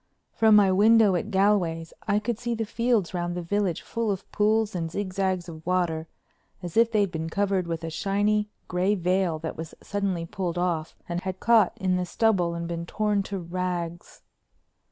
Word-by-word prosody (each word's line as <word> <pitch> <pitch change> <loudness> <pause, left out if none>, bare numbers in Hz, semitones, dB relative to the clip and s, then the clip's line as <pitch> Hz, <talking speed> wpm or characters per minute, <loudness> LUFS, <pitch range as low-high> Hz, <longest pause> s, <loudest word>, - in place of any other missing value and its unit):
From 220 -1 +5
my 200 -2 +6
window 215 +1 +5
at 175 +5 -2
Galway's 190 -5 +1
I 205 - +3
could 220 +1 -2
see 235 0 -2
the 225 0 -2
fields 225 -4 0
round 175 -1 -2
the 175 - -4
village 195 -1 -1
full 230 -1 -2
of 195 -1 -2
pools 215 +1 +2
and 165 -3 -2
zigzags 190 -1 -2
of 160 -2 -9
water 170 -3 0 0.6
as 175 -2 -6
if 230 0 +4
they'd 205 -4 +2
been 160 0 -3
covered 195 -1 0
with 165 -1 -3
a 165 - -4
shiny 205 +4 0 0.2
gray 185 +3 +1
veil 180 -2 +1
that 160 0 -5
was 160 0 -7
suddenly 195 -4 -2
pulled 175 0 -3
off 170 -3 -1
and 175 0 -3
had 185 0 -4
caught 230 -3 +4
in 185 -3 +1
the 180 - -1
stubble 185 -7 +1
and 170 0 -4
been 170 0 -4
torn 210 0 0
to 195 0 -5
rags. 175 -1 -4
185 Hz, 185 wpm, -26 LUFS, 170-210 Hz, 0.6 s, my